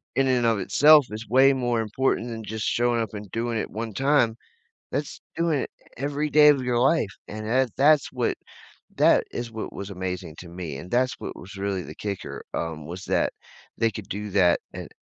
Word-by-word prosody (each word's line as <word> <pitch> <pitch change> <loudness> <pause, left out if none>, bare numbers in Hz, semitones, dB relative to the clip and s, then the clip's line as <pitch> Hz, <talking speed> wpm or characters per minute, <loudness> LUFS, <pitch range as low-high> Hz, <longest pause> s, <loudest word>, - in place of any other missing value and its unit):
in 135 0 +3
and 125 -2 +2
of 115 -3 +2
itself, 150 +9 +6
is 110 +1 -6
way 135 +3 +6
more 120 -3 0
important 115 +2 0
than 115 -1 -6
just 110 0 -4
showing 120 0 +1
up 110 -2 -4
and 105 -1 -7
doing 115 0 -2
it - - -3
one 110 0 -5
time. 135 -3 +2 0.6
That's - - -3 0.2
doing 165 -4 +1
it - - -4 0.3
every 145 +3 -2
day 150 0 +7
of 140 -3 +4
your 125 -1 0
life, 130 -3 +3 0.2
and 110 +1 -6
that 130 +2 +2
that's 145 +1 +4
what 125 -3 -1 0.6
that - - +5
is 120 -1 -5
what 110 -1 -6
was 100 0 -6
amazing 90 -3 -5
to 90 - -10
me, 85 -5 -6
and 90 - -9
that's 125 +1 +2
what - - -6
was 95 +3 -11
really 100 -1 -2
the - - -10
kicker, 100 -2 -5
um, 80 -2 -4
was 90 +4 -7
that - - +1 0.4
they 115 0 +2
could 105 -1 -8
do 105 +2 -4
that, 90 -3 +4
and - - -7
115 Hz, 205 wpm, -25 LUFS, 100-130 Hz, 0.6 s, day